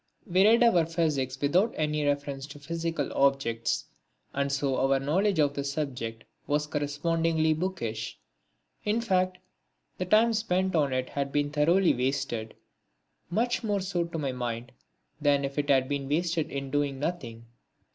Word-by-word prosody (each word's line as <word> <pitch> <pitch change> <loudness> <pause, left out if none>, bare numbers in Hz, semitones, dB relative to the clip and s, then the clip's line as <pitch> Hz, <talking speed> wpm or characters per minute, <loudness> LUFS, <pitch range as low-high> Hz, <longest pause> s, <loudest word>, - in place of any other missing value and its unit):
We 185 -2 +3
read 230 +2 +6
our 180 -9 +4
physics 150 -6 -1
without 180 +11 +2
any 150 -1 0
reference 140 -1 -1
to 145 0 -10
physical 165 0 -3
objects 135 -4 +1 0.5
and 140 0 0
so 140 -1 0
our 135 0 +3
knowledge 185 +8 +1
of 145 -2 +3
the 140 - -3
subject 125 -6 -4 0.2
was 150 +1 +1
correspondingly 160 +2 +1
bookish. 120 -11 -3 0.7
In 210 +2 +1
fact 185 -4 +1 0.6
the 185 - -1
time 220 +5 +4
spent 190 -4 0
on 145 -4 +2
it 130 0 -1
had 140 -1 -2
been 145 0 0
thoroughly 170 +5 +4
wasted; 125 -4 -2 0.7
much 240 +7 0
more 205 -2 0
so 185 -2 -1
to 170 -1 -5
my 140 -4 -1
mind 120 -1 -4 0.5
than 140 -1 +3
if 140 +1 -3
it 145 0 -2
had 130 -2 +4
been 140 -1 -3
wasted 165 +1 0
in 135 -1 -5
doing 145 -1 0
nothing. 125 -7 -4
145 Hz, 155 wpm, -28 LUFS, 135-175 Hz, 0.7 s, read